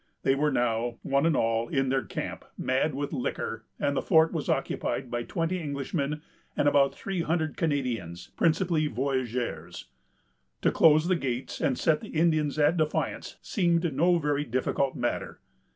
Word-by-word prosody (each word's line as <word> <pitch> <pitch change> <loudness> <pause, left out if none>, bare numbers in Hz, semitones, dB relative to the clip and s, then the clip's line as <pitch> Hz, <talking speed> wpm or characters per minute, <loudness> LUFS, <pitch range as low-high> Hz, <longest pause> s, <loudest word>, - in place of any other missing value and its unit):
They 135 - +4
were 145 +2 +1
now, 120 -2 0
one 140 +3 +2
and 165 - +2
all, 115 0 +1
in 135 -1 +1
their 135 0 +2
camp, - - -5
mad 130 +3 0
with 145 +2 -3
liquor, 115 -4 -3
and 140 0 0
the - - +1
fort 160 -2 +4
was - - -3
occupied 130 -3 -1
by 120 - -1
twenty 165 +8 -2
Englishmen, 145 0 -3 0.3
and 145 - +3
about 140 -1 +4
three 195 -3 -3
hundred 160 -2 -1
Canadians, 120 - -2
principally 165 -1 +2
voyageurs. 120 - -3 0.7
To - - +4
close 155 0 +5
the 185 - +3
gates, 130 -5 -3
and 130 - +1
set 155 -2 +2
the - - -9
Indians 155 -3 +1
at 155 +3 +3
defiance, 155 -1 -1
seemed 170 - +1
no 175 +6 +3
very 145 -2 0
difficult 130 +1 -1
matter. - - -3
145 Hz, 160 wpm, -28 LUFS, 130-160 Hz, 0.7 s, close